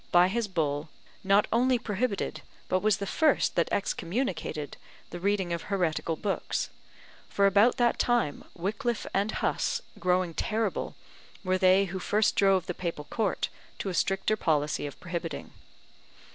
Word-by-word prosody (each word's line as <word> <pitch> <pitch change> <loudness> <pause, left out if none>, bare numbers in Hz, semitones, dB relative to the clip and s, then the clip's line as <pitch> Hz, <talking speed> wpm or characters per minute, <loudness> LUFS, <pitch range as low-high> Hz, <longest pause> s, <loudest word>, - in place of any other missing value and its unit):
by 175 +1 +6
his 230 +2 -1
bull, 155 -4 -1 0.3
not 200 +2 +4
only 250 +2 +4
prohibited, 220 -1 -2 0.3
but 185 - +2
was 210 0 +2
the 200 - -3
first 305 +8 +2
that 170 - +2
excommunicated 175 - -2 0.4
the 175 - -6
reading 190 -2 0
of 170 - -2
heretical 170 -4 -1
books; 195 +4 -2 0.6
for 200 - +2
about 205 +5 +5
that 240 -1 +2
time 240 -12 +1
Wickliffe 220 +6 -2
and 200 +3 +1
Huss, 475 - 0 0.2
growing 180 -1 +1
terrible, 215 +5 -1 0.5
were 185 0 +1
they 185 +1 +5
who 190 0 -5
first 210 +3 +2
drove 195 -3 +4
the 180 - -3
Papal 170 -4 -4
Court 215 -5 0 0.3
to 195 - -3
a - - -3
stricter 195 +4 +1
policy 150 -6 0
of 140 - -10
prohibiting. 170 -3 -5
195 Hz, 145 wpm, -28 LUFS, 175-215 Hz, 0.6 s, by